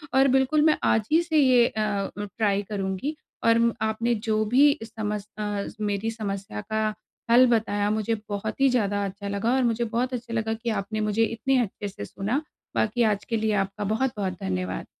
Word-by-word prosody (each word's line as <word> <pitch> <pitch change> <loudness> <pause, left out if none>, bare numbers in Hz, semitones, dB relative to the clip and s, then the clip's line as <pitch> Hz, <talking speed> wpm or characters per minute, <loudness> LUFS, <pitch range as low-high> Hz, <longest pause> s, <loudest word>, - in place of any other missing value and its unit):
और 270 +1 +6
बिल्कुल, 265 +3 +3
मैं 310 0 +4
आज 220 -1 +2
ही 325 - +5
से 320 -2 0
ये 255 -4 +6
अ 220 - -3
अ, 200 -2 -1 0.3
ट्राय 205 -2 +2
करुँगी 200 +8 -2 0.3
और 230 0 +4
आपने 220 +2 0
जो 215 0 +2
भी 280 +6 +4
समस 210 -2 -4
अ, 205 -1 -2 0.2
मेरी 210 +2 -1
समस्या 195 - -5
का 215 0 +1 0.4
हल 250 +2 +8
बताया, 205 -3 +1
मुझे 220 +1 0
बहुत 210 +5 -4
ही 275 - +6
ज़्यादा 205 -5 +1
अच्छा 200 +1 -6
लगा 200 +4 0
और 265 - +2
मुझे 235 -1 +1
बहुत 240 +3 -1
अच्छा 235 -1 -5
लगा 220 -1 0
कि 225 +1 -4
आपने 215 +2 -5
मुझे 210 +1 +1
इतने 230 +4 +1
अच्छे 205 -1 -4
से 100 - -7
सुना। 215 - -2 0.3
बाकी 225 +3 +1
आज 205 0 -6
के 230 - -1
लिए 220 0 0
आपका 195 +2 -6
बहुत-बहुत 210 -3 -1
धन्यवाद। 90 0 -2
220 Hz, 190 wpm, -25 LUFS, 205-240 Hz, 0.4 s, हल